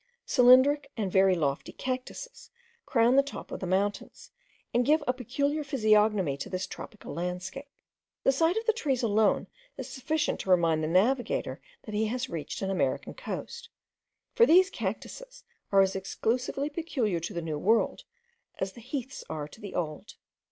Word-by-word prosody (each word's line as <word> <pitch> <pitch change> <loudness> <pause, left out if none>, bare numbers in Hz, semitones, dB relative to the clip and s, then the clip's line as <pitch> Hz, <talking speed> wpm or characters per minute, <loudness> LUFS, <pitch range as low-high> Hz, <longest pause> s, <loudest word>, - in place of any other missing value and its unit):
Cylindric 260 +3 +5
and 200 -4 -1
very 190 0 +5
lofty 145 -4 -1
cactuses 265 - -6 0.4
crown 240 -1 +4
the - - +8
top 280 +1 -8
of - - -5
the 185 - -4
mountains, 200 +3 -2 0.4
and 245 - +3
give 300 +4 +3
a 250 - +2
peculiar 280 +5 -1
physiognomy 215 - +2
to 140 - -6
this 185 0 -2
tropical 215 - -9
landscape. 180 +10 -4 0.6
The - - +5
sight 325 +8 +2
of 450 - -2
the 450 - +3
trees 275 - -1
alone 215 -1 +2 0.3
is - - -5
sufficient 305 +3 -1
to - - -6
remind 165 -3 +3
the - - 0
navigator 230 +10 +1 0.2
that 215 - -8
he 215 +1 +1
has 250 +3 -3
reached 160 +3 -5
an 195 - -1
American 190 - -1
coast; 475 -1 -7 0.6
for 470 - +5
these 370 +4 +6
cactuses - - -6 0.3
are 195 -1 +6
as 190 0 +2
exclusively 245 +8 -1
peculiar 275 - -1
to 170 +5 -5
the - - -1
New 155 -2 -3
World, 220 +7 +1 0.5
as 190 0 -3
the 235 - -12
heaths 260 +2 -5
are 150 -2 -4
to - - -15
the 205 - -7
Old. 155 -3 -4
230 Hz, 165 wpm, -28 LUFS, 190-280 Hz, 0.6 s, the